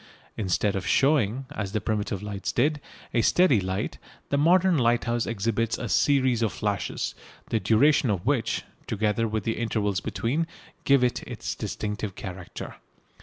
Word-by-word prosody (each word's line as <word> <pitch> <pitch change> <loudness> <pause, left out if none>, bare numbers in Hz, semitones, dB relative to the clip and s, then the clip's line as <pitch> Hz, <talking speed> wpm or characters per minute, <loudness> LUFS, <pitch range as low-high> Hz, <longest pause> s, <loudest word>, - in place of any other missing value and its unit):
Instead 100 0 0
of 95 -2 -3
showing, 135 -3 +2
as 105 -8 -4
the 110 - +1
primitive 105 -2 -2
lights 100 -2 -3
did, 150 +4 +1 0.3
a 120 - +3
steady 140 - +4
light, 95 +2 -3 0.3
the - - +1
modern 180 +4 +4
lighthouse 120 -2 +1
exhibits 115 +1 0
a - - -4
series 130 -4 +3
of 110 -3 +1
flashes, 105 -2 -2 0.4
the 115 - +2
duration 115 +7 +4
of 100 -2 -1
which, 130 -4 0 0.2
together 110 +1 0
with 110 -1 -2
the 115 - -1
intervals 105 -4 0
between, 150 +8 -1 0.4
give 140 -2 +5
it 125 - +1
its - - -4
distinctive 105 -2 -4
character. 95 -6 -7
115 Hz, 150 wpm, -26 LUFS, 105-130 Hz, 0.4 s, give